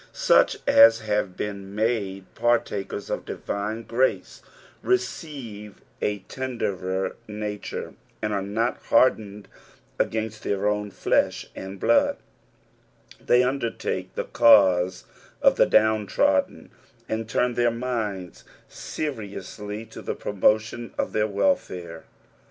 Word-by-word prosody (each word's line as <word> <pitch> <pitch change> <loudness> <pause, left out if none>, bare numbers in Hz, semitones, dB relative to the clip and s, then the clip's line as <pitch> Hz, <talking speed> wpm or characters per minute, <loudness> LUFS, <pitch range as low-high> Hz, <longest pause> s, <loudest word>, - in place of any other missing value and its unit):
Such - - +4
as 115 0 +7
have 105 -3 -1
been 100 -1 -5
mude 105 -4 -1
partakers 115 -4 -1
of - - -2
divine 105 +3 -4
grace 125 +3 -1 0.4
receive 130 - -3 0.2
a 105 -2 -1
tenderer 95 -8 -3
nature, 105 -1 -5 0.3
and 105 0 -2
are 100 - 0
not 110 +5 -1
hardened 105 -5 +2 0.5
against 110 -1 -2
tlieir 100 -1 -1
own 105 0 -1
flesh - - 0
and 95 0 -7
blood; 115 +4 +3 1.1
thev 125 +1 +4
undertake 125 -3 -3
the - - -1
cause 95 -5 +5 0.4
of - - +4
the - - +5
downtrodden, 110 -3 +2 0.4
and 110 0 -3
turn 125 +2 +1
their 120 0 +2
minds 115 -7 -4 0.2
seriously 105 -5 -6
to 110 - -11
the - - -4
promotion 110 +3 0
of - - -2
their 105 0 +2
welfare. 90 - -1
105 Hz, 110 wpm, -25 LUFS, 100-115 Hz, 1.1 s, as